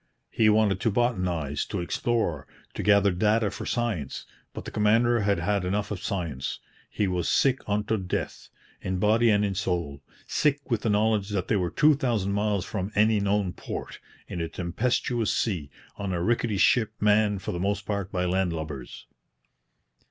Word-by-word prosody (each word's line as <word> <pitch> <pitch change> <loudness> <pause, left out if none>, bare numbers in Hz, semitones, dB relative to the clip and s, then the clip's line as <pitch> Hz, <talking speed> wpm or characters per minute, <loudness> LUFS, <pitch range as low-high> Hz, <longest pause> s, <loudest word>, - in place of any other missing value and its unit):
He 110 -1 +3
wanted 105 -3 +3
to 115 - +1
botanize, 90 - 0
to 100 - -3
explore, 85 - -1 0.3
to - - -4
gather 100 -1 +4
data 105 +3 +2
for - - -6
science; 110 - -2 0.3
but - - -8
the - - -6
commander 115 +3 +3
had 100 -1 +1
had 100 +3 0
enough 100 +3 -1
of 100 -3 -4
science. 85 -9 -3 0.3
He 105 - -1
was 90 -2 -1
sick 135 -1 +3
unto 105 +2 0
death, 95 -2 -4 0.3
in 95 0 -2
body 110 +4 +3
and 105 -1 +3
in 100 - -1
soul, 85 -7 -2 0.2
sick 145 -2 0
with 115 -3 +1
the 115 - 0
knowledge 105 -1 +2
that 100 -3 -2
they 110 - +3
were 90 -3 0
two 150 - +4
thousand 120 -9 0
miles 100 -2 0
from 100 -1 -4
any 110 +1 +4
known 100 -2 0
port, - - -7 0.3
in 85 - -4
a 80 - -3
tempestuous 115 +5 -1
sea, 90 -11 -1 0.3
on 100 -2 -3
a 85 -1 -1
rickety 115 -1 +1
ship 110 +1 +3
manned 105 -2 +2
for - - -3
the 85 - -4
most 100 +2 -1
part 100 -2 -3
by 90 0 -1
land 90 0 +1
lubbers. 75 -6 -6
100 Hz, 175 wpm, -26 LUFS, 90-110 Hz, 0.3 s, gather